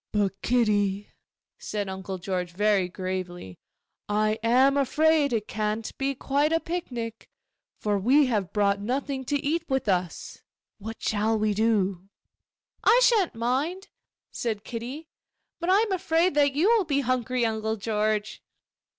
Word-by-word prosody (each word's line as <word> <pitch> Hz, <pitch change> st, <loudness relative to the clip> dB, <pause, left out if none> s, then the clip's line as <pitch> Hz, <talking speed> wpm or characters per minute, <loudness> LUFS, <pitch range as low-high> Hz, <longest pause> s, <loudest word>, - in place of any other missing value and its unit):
'But, 200 Hz, -2 st, -1 dB
Kitty,' 205 Hz, -4 st, +1 dB, 0.5 s
said 205 Hz, -2 st, -4 dB
Uncle 190 Hz, 0 st, -5 dB
George 180 Hz, -1 st, -3 dB
very 200 Hz, -1 st, +2 dB
gravely, 180 Hz, -, -5 dB, 0.5 s
'I 215 Hz, +1 st, +1 dB
am 255 Hz, +4 st, +4 dB
afraid 300 Hz, +1 st, +3 dB
it 220 Hz, -3 st, -1 dB
can't 215 Hz, +1 st, -3 dB
be 275 Hz, 0 st, 0 dB
quite 285 Hz, +4 st, 0 dB
a 325 Hz, -, +3 dB
picnic, 245 Hz, -11 st, -5 dB, 0.5 s
for 205 Hz, -1 st, 0 dB
we 270 Hz, +9 st, +4 dB
have 210 Hz, -8 st, -1 dB
brought 200 Hz, -1 st, +1 dB
nothing 265 Hz, +4 st, -2 dB
to 285 Hz, -, 0 dB
eat 325 Hz, +3 st, 0 dB
with 265 Hz, -3 st, 0 dB
us. 180 Hz, -3 st, -2 dB, 0.4 s
What 220 Hz, +2 st, -7 dB
shall 220 Hz, +1 st, +1 dB
we 215 Hz, -1 st, +1 dB
do?' 200 Hz, -4 st, 0 dB, 0.7 s
'I 475 Hz, -, +6 dB
shan't 430 Hz, -, +3 dB
mind,' 275 Hz, -, -2 dB, 0.4 s
said 220 Hz, -3 st, -3 dB
Kitty; 255 Hz, +7 st, -6 dB, 0.5 s
'but 340 Hz, +1 st, -2 dB
I 390 Hz, +3 st, +5 dB
am 450 Hz, -2 st, -1 dB
afraid 345 Hz, -1 st, +1 dB
that 285 Hz, -1 st, +3 dB
you 310 Hz, +8 st, +2 dB
will 455 Hz, -5 st, +4 dB
be 280 Hz, -3 st, +1 dB
hungry, 255 Hz, -1 st, 0 dB
Uncle 220 Hz, 0 st, -1 dB
George. 215 Hz, 0 st, -1 dB
225 Hz, 140 wpm, -26 LUFS, 205-280 Hz, 0.7 s, I